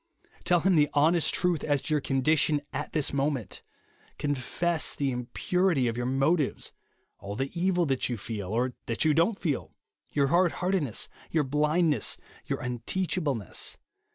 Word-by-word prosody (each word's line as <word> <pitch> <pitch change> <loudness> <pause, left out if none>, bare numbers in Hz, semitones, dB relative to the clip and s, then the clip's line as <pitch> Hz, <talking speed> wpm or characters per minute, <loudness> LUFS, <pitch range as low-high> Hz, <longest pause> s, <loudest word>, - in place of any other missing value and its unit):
Tell 175 -1 +4
him 185 0 +3
the 150 -1 +4
honest 160 +3 +4
truth 175 -3 +1
as 145 -2 +2
to 155 - -2
your 150 - +2
condition 145 +3 +2
at 145 +2 -4
this 150 -3 0
moment. 140 -5 -1 0.6
Confess 150 +4 -1
the 140 -2 0
impurity 135 +4 0
of 115 - -1
your 120 0 -2
motives; 135 +3 +1 0.5
all 100 +1 -6
the 135 +4 -2
evil 180 0 +1
that 135 -3 0
you 120 - -2
feel 105 -2 -5
or 125 +4 0
that 115 +6 0
you 155 - +5
don't 170 +7 +2
feel; 155 -8 -3 0.3
your 140 -2 +1
hard 175 +2 +3
heartedness, 180 - 0 0.2
your 160 -2 +2
blindness, 150 +3 +2 0.3
your - - -2
unteachableness. 130 - -1
150 Hz, 155 wpm, -28 LUFS, 130-170 Hz, 0.6 s, you